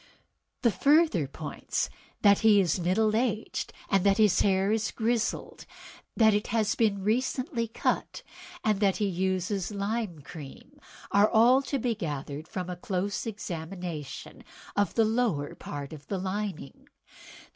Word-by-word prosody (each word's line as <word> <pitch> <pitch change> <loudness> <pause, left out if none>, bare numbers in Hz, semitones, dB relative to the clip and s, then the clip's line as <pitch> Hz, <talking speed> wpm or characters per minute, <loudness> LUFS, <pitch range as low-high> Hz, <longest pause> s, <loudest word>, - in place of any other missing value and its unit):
"The 235 - +5
further 280 - +3
points, 150 +2 -3 0.4
that 200 -1 +6
he 215 -2 +6
is 180 -2 +1
middle 210 +5 +2
aged, 225 -2 -1 0.2
that 195 0 +4
his 210 -5 +4
hair 195 0 +2
is 220 0 +1
grizzled, 230 0 -2 0.5
that 220 -2 +6
it 210 0 0
has 215 -2 +1
been 205 -4 +1
recently 245 - 0
cut, 225 - -2 0.4
and 215 -2 +2
that 200 -2 +2
he 210 - 0
uses 190 0 -1
lime 205 -4 -3
cream, 160 - -11 0.3
are 200 +2 +5
all 245 +4 +5
to 275 +1 -2
be 245 -1 0
gathered 150 -6 -5
from 180 -2 -4
a 180 - -4
close 195 +4 -2
examination 175 -6 -6 0.3
of 205 0 +1
the 225 - +4
lower 215 -11 0
part 145 +1 -7
of 150 -2 -11
the 195 - -2
lining. 190 -5 -4
200 Hz, 140 wpm, -28 LUFS, 180-225 Hz, 0.5 s, that